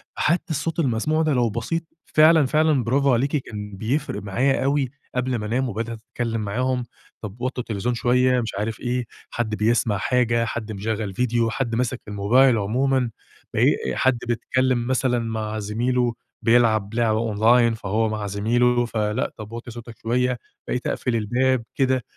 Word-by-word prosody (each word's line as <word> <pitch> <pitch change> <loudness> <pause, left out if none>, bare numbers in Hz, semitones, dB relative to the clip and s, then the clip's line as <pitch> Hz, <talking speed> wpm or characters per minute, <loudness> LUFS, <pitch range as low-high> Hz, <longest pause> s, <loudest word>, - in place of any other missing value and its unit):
حتى 170 +4 +1
الصوت 160 +3 -2
المسموع 150 +4 +1
ده 155 -2 +2
لو 120 -2 +2
بسيط 120 +10 -2 0.2
فعلًا، 155 -1 +5
فعلًا 155 -2 +2
برافو 135 +2 +2
عليكِ 135 +5 +1
كان 105 -5 -7
بيفرق 135 +9 -2
معايا 130 +8 +1
أوي، 140 -1 +1 0.3
قبل 125 0 0
ما 105 -2 -3
أنام 125 +4 0
وبدأت 115 +2 -4
أتكلم 115 -2 -2
معاهم، 125 +4 -1 0.4
طب 105 +2 -8
وطّوا 130 0 -2
التلفزيون 115 +3 -2
شويّة 125 +1 +3
مش 115 -4 -4
عارف 110 +1 -3
إيه، 125 0 -2 0.2
حد 110 -3 -2
بيسمع 110 -1 +1
حاجة 115 +2 +1
حد 110 -2 -4
مشغل 105 0 -3
فيديو، 120 +1 +1
حد 115 -1 -2
ماسك 125 +1 -1
الموبايل 115 +5 +4
عمومًا، 125 +4 +1 0.4
بقي - - +3 0.3
حد 130 -2 +2
بيتكلم 120 +1 0
مثلًا 130 -2 +1
مع 110 -1 -3
زميله 120 +3 0 0.3
بيلعب 115 -3 +3
لعبة 110 -2 +1
Online 115 +2 +4
فهو 110 +1 0
مع 105 -1 -3
زميله 120 +4 +2
فلأ، 110 +1 -1
طب 110 0 -9
وطّي 120 +1 -7
صوتك 120 0 -10
شوّية، 125 +2 +1 0.3
بقيت 125 - -2
أقفل 125 - -1
الباب 125 +3 +1
كده، 130 -2 +1
120 Hz, 155 wpm, -23 LUFS, 110-130 Hz, 0.4 s, فعلًا